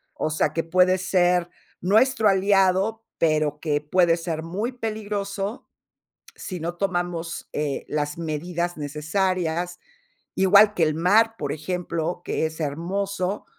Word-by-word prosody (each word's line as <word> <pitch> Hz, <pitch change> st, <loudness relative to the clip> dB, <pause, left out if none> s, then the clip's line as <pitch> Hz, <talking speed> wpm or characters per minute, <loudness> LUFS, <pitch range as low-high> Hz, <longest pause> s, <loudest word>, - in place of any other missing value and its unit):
o -, -, -1 dB
sea, 155 Hz, 0 st, 0 dB
que 165 Hz, -, -1 dB
puede 185 Hz, +2 st, +3 dB
ser, 180 Hz, -1 st, +2 dB, 0.3 s
nuestro 220 Hz, +3 st, +3 dB
aliado, 195 Hz, +2 st, +2 dB
pero 155 Hz, -2 st, +1 dB
que 150 Hz, -2 st, 0 dB
puede 170 Hz, +2 st, +3 dB
ser 165 Hz, -2 st, -4 dB
muy 205 Hz, +9 st, -3 dB
peligroso 210 Hz, -3 st, -4 dB, 0.7 s
si 185 Hz, -3 st, -6 dB
no 170 Hz, +2 st, -3 dB
tomamos, 175 Hz, -3 st, -3 dB
eh, 145 Hz, -2 st, -2 dB
las 150 Hz, +1 st, -2 dB
medidas 170 Hz, +2 st, -3 dB
necesarias. 170 Hz, +3 st, -1 dB, 0.6 s
Igual 200 Hz, +2 st, +6 dB
que 175 Hz, -, -2 dB
el 155 Hz, -1 st, +2 dB
mar, 220 Hz, +7 st, +3 dB
por 145 Hz, -2 st, -3 dB
ejemplo, 170 Hz, +1 st, -3 dB
que -, -, -1 dB
es 160 Hz, +1 st, -10 dB
hermoso, 185 Hz, +6 st, -2 dB
175 Hz, 130 wpm, -24 LUFS, 160-195 Hz, 0.7 s, Igual